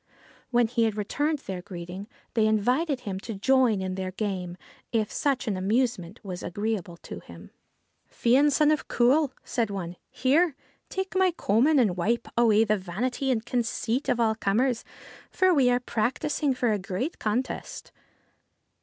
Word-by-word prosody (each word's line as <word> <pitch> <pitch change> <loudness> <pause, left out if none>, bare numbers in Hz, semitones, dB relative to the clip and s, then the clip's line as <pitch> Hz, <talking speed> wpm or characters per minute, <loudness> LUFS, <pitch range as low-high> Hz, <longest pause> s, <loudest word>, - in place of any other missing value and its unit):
When 240 -1 +3
he 230 0 +1
had 215 -1 -1
returned 290 +9 0
their 190 -9 -6
greeting, 180 +2 -8 0.3
they 220 -2 +3
invited 250 +7 +1
him 195 -5 -4
to 220 +2 -6
join 255 +1 +3
them 190 - -3
in 185 - -3
their 190 0 -3
game 185 -3 -3 0.3
if 220 -2 0
such 275 -4 0
an 210 - 0
amusement 195 -2 0
was 180 -2 -5
agreeable 200 -2 -3
to - - -7
him. - - -13 0.3
' - - -44
Fion, 270 +5 +3
son 300 +1 +4
of 305 - -1
Cumhail,' 265 +4 +3
said 230 -4 -1
one, 180 -3 -5
' - - -52
here, 300 +4 +4 0.3
take 380 0 -4
my 375 0 +4
coman 290 - +2
and 215 -9 +3
wipe 230 +7 0
away 225 -2 +5
the 215 -1 +1
vanity 240 +9 -2
and 230 -3 0
conceit 240 +1 -1
of 245 - +1
all 225 -2 +3
comers, 225 +4 0 0.5
for 370 -1 +3
we 270 -6 +4
are 245 0 +3
practising 250 +4 -1
for 245 -2 +1
a 210 - 0
great 200 - -4
contest.' 230 +5 -3
230 Hz, 170 wpm, -27 LUFS, 200-260 Hz, 0.5 s, away